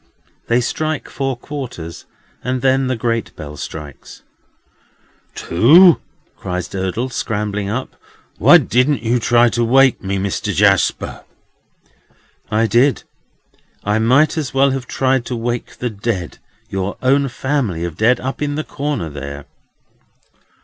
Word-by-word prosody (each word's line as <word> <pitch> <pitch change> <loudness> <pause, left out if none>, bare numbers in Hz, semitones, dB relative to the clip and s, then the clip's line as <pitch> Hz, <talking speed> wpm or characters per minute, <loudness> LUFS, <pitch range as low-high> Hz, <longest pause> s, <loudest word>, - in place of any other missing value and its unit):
They 120 +1 +2
strike 155 +5 -2
four 135 -2 -3
quarters, 120 - -7 0.4
and 125 0 -2
then 135 0 +2
the 130 - 0
great 115 0 -2
bell 75 -2 -8
strikes. 75 -1 -9 1.1
"Two!" 160 - +5 0.3
cries 90 -1 -4
Durdles, 100 +7 -3
scrambling 105 -2 -2
up; 130 +5 -4 0.4
"why - - +8
didn't 125 +2 +1
you 120 +2 +1
try 120 +1 +4
to 120 +1 0
wake 130 +2 +4
me, 100 0 -2
Mister 95 0 -2
Jarsper?" - - +1 1.3
"I 110 +2 +2
did. 120 +6 +2 0.8
I 105 +1 +1
might 130 +8 +3
as 140 -3 -5
well 135 +1 +4
have 130 -1 -4
tried 130 -1 +1
to 125 - -3
wake 120 +1 -4
the 125 -1 -3
dead—your 95 -2 -5
own 140 +2 +3
family 120 - -2
of 85 -2 -5
dead, 115 +6 +3
up 135 +3 -5
in 145 -1 -1
the 155 - -2
corner 145 - -3
there." 70 -1 -7
120 Hz, 130 wpm, -18 LUFS, 100-135 Hz, 1.3 s, why